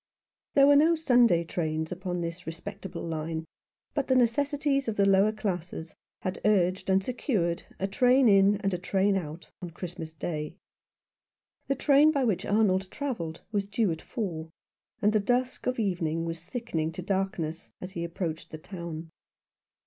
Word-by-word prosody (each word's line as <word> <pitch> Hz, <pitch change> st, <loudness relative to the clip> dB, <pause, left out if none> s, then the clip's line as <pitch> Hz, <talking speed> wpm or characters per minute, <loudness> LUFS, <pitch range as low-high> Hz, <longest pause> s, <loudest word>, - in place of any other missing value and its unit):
There 275 Hz, -, +7 dB
were 285 Hz, 0 st, +7 dB
no 320 Hz, +4 st, +5 dB
Sunday 245 Hz, -, +4 dB
trains 160 Hz, -2 st, -2 dB
upon 180 Hz, -1 st, -3 dB
this 170 Hz, +1 st, -5 dB
respectable 190 Hz, +4 st, -6 dB
line; 160 Hz, 0 st, -3 dB, 0.5 s
but 285 Hz, -2 st, -1 dB
the 260 Hz, -, +3 dB
necessities 275 Hz, +3 st, +2 dB
of 220 Hz, -, -1 dB
the 200 Hz, -, +3 dB
lower 195 Hz, +2 st, +5 dB
classes 180 Hz, -6 st, -4 dB, 0.3 s
had 185 Hz, -, -3 dB
urged 190 Hz, -3 st, +2 dB
and 190 Hz, 0 st, +3 dB
secured 195 Hz, -, -1 dB, 0.2 s
a 195 Hz, -, -1 dB
train 250 Hz, +5 st, +4 dB
in 200 Hz, 0 st, +6 dB
and 195 Hz, -1 st, 0 dB
a 180 Hz, -, -1 dB
train 195 Hz, +2 st, +2 dB
out 165 Hz, -2 st, -5 dB
on 175 Hz, -, -5 dB
Christmas 170 Hz, -1 st, -7 dB
Day. 155 Hz, -1 st, -4 dB, 1.1 s
The 275 Hz, -, +1 dB
train 290 Hz, +2 st, +5 dB
by 280 Hz, -3 st, +1 dB
which 215 Hz, -7 st, 0 dB
Arnold 195 Hz, -3 st, +2 dB
travelled 225 Hz, -, -4 dB
was 200 Hz, -2 st, -1 dB
due 205 Hz, -2 st, +1 dB
at 160 Hz, -, -4 dB
four, 170 Hz, -9 st, -4 dB, 0.5 s
and 210 Hz, +1 st, +4 dB
the 215 Hz, -, +4 dB
dusk 250 Hz, +5 st, 0 dB
of 255 Hz, -, 0 dB
evening 170 Hz, -6 st, -1 dB
was 165 Hz, 0 st, -5 dB
thickening 175 Hz, -11 st, -2 dB
to 180 Hz, -, -6 dB
darkness 185 Hz, -4 st, -2 dB
as 185 Hz, -, -7 dB
he 170 Hz, -2 st, -4 dB
approached 165 Hz, -1 st, -4 dB
the 155 Hz, -, -7 dB
town. 165 Hz, -2 st, -7 dB
190 Hz, 165 wpm, -28 LUFS, 170-230 Hz, 1.1 s, There